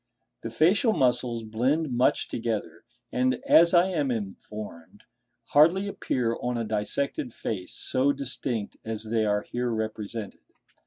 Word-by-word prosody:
The 115 Hz, -, -5 dB
facial 180 Hz, -, +3 dB
muscles 120 Hz, -, +1 dB
blend 130 Hz, +8 st, 0 dB
much 125 Hz, +2 st, +2 dB
together, 110 Hz, -8 st, -4 dB, 0.3 s
and, 130 Hz, +1 st, +2 dB
as 170 Hz, +1 st, +6 dB
I 175 Hz, 0 st, +6 dB
am 150 Hz, -7 st, 0 dB
informed, 105 Hz, -5 st, -6 dB, 0.5 s
hardly 170 Hz, +7 st, +5 dB
appear 120 Hz, -11 st, -1 dB
on 125 Hz, 0 st, -1 dB
a 115 Hz, -, -1 dB
dissected 110 Hz, +5 st, -2 dB
face 95 Hz, -5 st, -5 dB
so 130 Hz, +2 st, +1 dB
distinct 125 Hz, -5 st, -4 dB
as 110 Hz, -1 st, -4 dB
they 110 Hz, 0 st, 0 dB
are 105 Hz, 0 st, +1 dB
here 125 Hz, 0 st, -2 dB
represented. 110 Hz, -1 st, -4 dB
120 Hz, 135 wpm, -27 LUFS, 110-140 Hz, 0.5 s, as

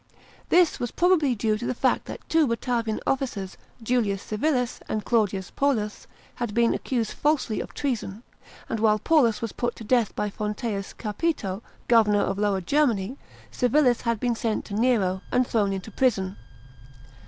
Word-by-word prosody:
This 345 Hz, -3 st, +4 dB
was 245 Hz, -1 st, -2 dB
probably 325 Hz, -7 st, +3 dB
due 215 Hz, 0 st, 0 dB
to 240 Hz, -, -4 dB
the 255 Hz, -, -1 dB
fact -, -, +1 dB
that -, -, -9 dB
two 320 Hz, -2 st, +3 dB
Batavian 230 Hz, -2 st, -1 dB
offirers, 240 Hz, -8 st, -2 dB, 0.3 s
Julius 220 Hz, -5 st, 0 dB
Civilis 250 Hz, +2 st, -1 dB
and 215 Hz, -1 st, -2 dB
Claudius 205 Hz, -5 st, 0 dB
Panllus, 225 Hz, -7 st, -1 dB, 0.3 s
bad 235 Hz, -4 st, -3 dB
been 235 Hz, 0 st, +3 dB
accused 235 Hz, -4 st, -2 dB
falsely 295 Hz, -7 st, 0 dB
of -, -, -9 dB
treason, 235 Hz, -6 st, -3 dB, 0.4 s
and 225 Hz, -, -2 dB
while 215 Hz, -1 st, +4 dB
Paullus 235 Hz, -3 st, +2 dB
was 230 Hz, -, -2 dB
put 240 Hz, -1 st, -2 dB
to -, -, -9 dB
death 235 Hz, -1 st, +1 dB
by 210 Hz, -1 st, -2 dB
Fonteins 210 Hz, -1 st, -3 dB
Capito, 210 Hz, -, -2 dB, 0.3 s
governor 215 Hz, -3 st, +4 dB
of 195 Hz, +1 st, -1 dB
Lower 205 Hz, -2 st, +1 dB
Germany, 240 Hz, -, +1 dB, 0.4 s
Civil's 250 Hz, -1 st, +3 dB
hnd 230 Hz, -2 st, -1 dB
been 245 Hz, +1 st, +1 dB
sent 225 Hz, -1 st, -2 dB
to -, -, -8 dB
Nero, 205 Hz, -5 st, +2 dB
and 250 Hz, 0 st, +3 dB
thrown 210 Hz, -4 st, +1 dB
into 195 Hz, +3 st, -5 dB
prison. 195 Hz, -6 st, +1 dB
230 Hz, 160 wpm, -25 LUFS, 210-250 Hz, 0.4 s, This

